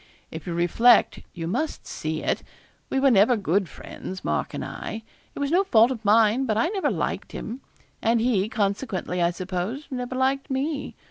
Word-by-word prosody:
If 160 0 -8
you 170 - -2
reflect 220 +8 +4 0.2
you 165 -2 -4
must 305 - -2
see 155 0 -4
it. - - 0 0.5
We 265 - +1
were 270 0 +5
never 225 +3 +5
good 195 -1 0
friends, 185 0 -8
Mark - - -1
and - - -4
I. 220 +1 -6 0.3
It - - -6
was 285 0 -1
no 365 +3 +4
fault 235 - +5
of 230 -4 -5
mine, 220 +4 +4
but 215 -1 +1
I 230 - +2
never 390 -1 0
liked - - -3
him; 245 +4 -6 0.4
and 230 +1 +3
he, 220 -4 +1
consequently, 200 -4 -1
I 170 - +4
suppose, 185 - -4
never 250 0 -4
liked 270 +2 0
me. 280 +2 -2
225 Hz, 185 wpm, -25 LUFS, 190-265 Hz, 0.5 s, were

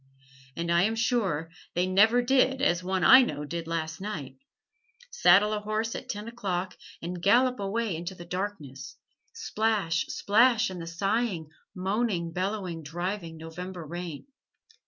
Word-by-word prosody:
And 170 0 -2
I 170 0 +4
am 220 +4 +1
sure 195 -9 0 0.2
they 175 +1 +2
never 220 +6 +4
did 265 +1 +3
as 175 -10 +1
one 185 0 -1
I 260 +7 +9
know 150 - -2
did 165 +2 -5
last 165 0 -3
night: 185 - -6 0.7
saddle 210 - +5
a 210 - -1
horse 215 +2 -2
at - - -7
ten 210 +2 -5
o'clock 190 -6 -3 0.3
and 175 +1 -5
gallop 250 +6 +3
away 205 0 -1
into 175 +3 -5
the 175 - -10
darkness; 180 -8 -5 0.3
splash, 205 -7 -1
splash 230 +1 +3
in 180 - -7
the 165 - -7
sighing, 190 -1 -1 0.3
moaning, 190 -2 -1
bellowing, 185 -2 -3
driving 170 +2 -4
November 170 +2 -7
rain. 170 -1 -6
185 Hz, 145 wpm, -28 LUFS, 170-215 Hz, 0.7 s, I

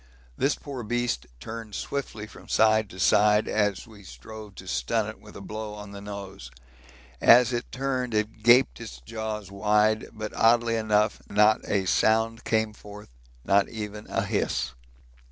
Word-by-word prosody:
This 140 - +1
poor 140 -4 -7
beast 120 - -2
turned 110 - -7
swiftly 125 -6 -4
from 110 - -15
side 110 -1 +3
to 95 - -11
side 105 +2 +4
as 105 -3 0
we 110 -3 -15
strove 100 - -11
to - - -11
stun 60 -1 0
it - - -8
with - - -15
a - - -9
blow 105 +1 -6
on 105 -1 -9
the 100 0 -9
nose. 100 -8 -8 0.7
As 125 +1 +6
it 120 - -3
turned 130 -3 -2
it 105 +1 -2
gaped 120 - +5
its 60 0 -8
jaws 105 - -5
wide, 105 +2 +2
but 110 -1 -6
oddly 115 0 +3
enough 110 -1 +1
not 105 +1 +4
a 100 -2 +1
sound 110 +4 +2
came 110 -1 +1
forth, 105 0 -12 0.4
not 100 0 +3
even 105 -1 -7
a - - -1
hiss. - - -1
110 Hz, 160 wpm, -26 LUFS, 100-115 Hz, 0.7 s, As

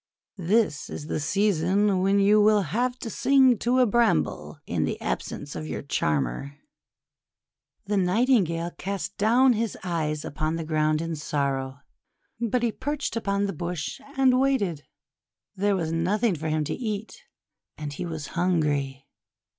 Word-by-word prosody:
This 190 -3 +1
is 145 - -6
the 155 - -2
season 195 +3 +2
when 195 +1 +3
you 205 +2 +5
will 210 -1 +4
have 245 +8 -1
to 230 - -4
sing 265 -2 +4
to 245 +2 +1
a 255 - +5
Bramble 205 - +1
in - - -1
the - - -2
ab - - -1
sence 145 0 -8
of 155 - -5
your - - -5
charmer!'1 75 - -1 1.3
The 205 +1 0
Nightingale 180 -4 +2
cast 200 +1 -4
down 245 +5 +5
his 225 -1 -2
eyes 155 -4 -2
upon 155 +2 -2
the 165 - -3
ground 155 0 +1
in 165 -1 -3
sorrow, 140 -2 -2 0.6
but 240 +1 0
he 235 - +2
perched 290 +3 -3
upon 200 -3 0
the 195 - -3
bush 170 0 -4 0.2
and 260 -1 +4
waited. 205 - 0 0.7
There 200 +1 +1
was 165 -4 -2
nothing 190 +6 +1
for 155 0 -4
him 155 0 0
to - - -3
eat, 215 -3 -5 0.6
and 150 -2 -5
he 175 - -5
was 155 -4 -6
hungry. 145 -6 0
185 Hz, 155 wpm, -26 LUFS, 155-215 Hz, 1.3 s, you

